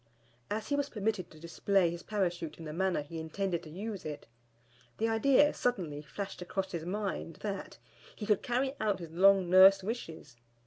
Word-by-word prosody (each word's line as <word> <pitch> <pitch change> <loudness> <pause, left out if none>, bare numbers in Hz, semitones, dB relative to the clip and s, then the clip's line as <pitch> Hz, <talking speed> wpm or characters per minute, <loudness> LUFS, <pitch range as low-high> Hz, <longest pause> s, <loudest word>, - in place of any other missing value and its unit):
As 215 +1 -3
he 285 - +2
was 285 0 -1
permitted 210 -5 -2
to 155 - -15
display 170 +2 +1
his 170 0 -6
Parachute 175 -6 -2
in 165 - -9
the 155 - -5
manner 185 -3 0
he 160 +3 -7
intended 170 +2 -2
to 165 - -11
use 200 +4 -5
it, 150 -1 -6 0.7
the 225 - +1
idea 265 +6 +4
suddenly 175 -12 -1
flashed 195 +6 -7
across 190 +2 -3
his 165 -2 -4
mind 190 -3 -3
that, 200 -2 -5 0.4
he 210 - -6
could 210 -2 +2
carry 260 +2 0
out 210 -3 +1
his 170 -3 -9
long 190 +2 +5
nursed 190 +2 +7
wishes. 165 - -6
190 Hz, 180 wpm, -31 LUFS, 170-215 Hz, 0.7 s, nursed